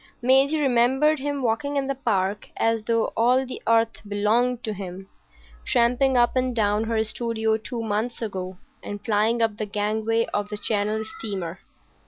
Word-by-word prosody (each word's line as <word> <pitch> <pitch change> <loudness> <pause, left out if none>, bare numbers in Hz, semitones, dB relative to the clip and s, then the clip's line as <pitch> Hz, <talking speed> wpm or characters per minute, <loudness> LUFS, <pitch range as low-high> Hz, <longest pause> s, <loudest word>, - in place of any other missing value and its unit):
Maisie 270 +5 +4
remembered 265 +3 +3
him 285 0 -3
walking 285 +5 0
in 275 - 0
the 275 - -1
Park 205 -6 -1
as 225 0 +1
though 230 -1 0
all 250 +3 +3
the 255 - -7
earth 230 0 +2
belonged 225 +4 +1
to 215 - -3
him, 190 -1 -8 0.6
tramping 250 +2 +2
up 240 +1 +3
and 255 -1 0
down 210 0 +1
her 225 -1 +1
studio 220 0 0
two 230 +1 -5
months 220 +2 -2
ago, 190 -4 -5 0.2
and 205 0 -7
flying 225 +2 +2
up 220 -2 0
the 215 - -2
gangway 220 +2 0
of 205 0 -1
the 210 - -3
Channel 210 +1 -1
steamer. 195 -5 -5
225 Hz, 165 wpm, -24 LUFS, 210-245 Hz, 0.6 s, Maisie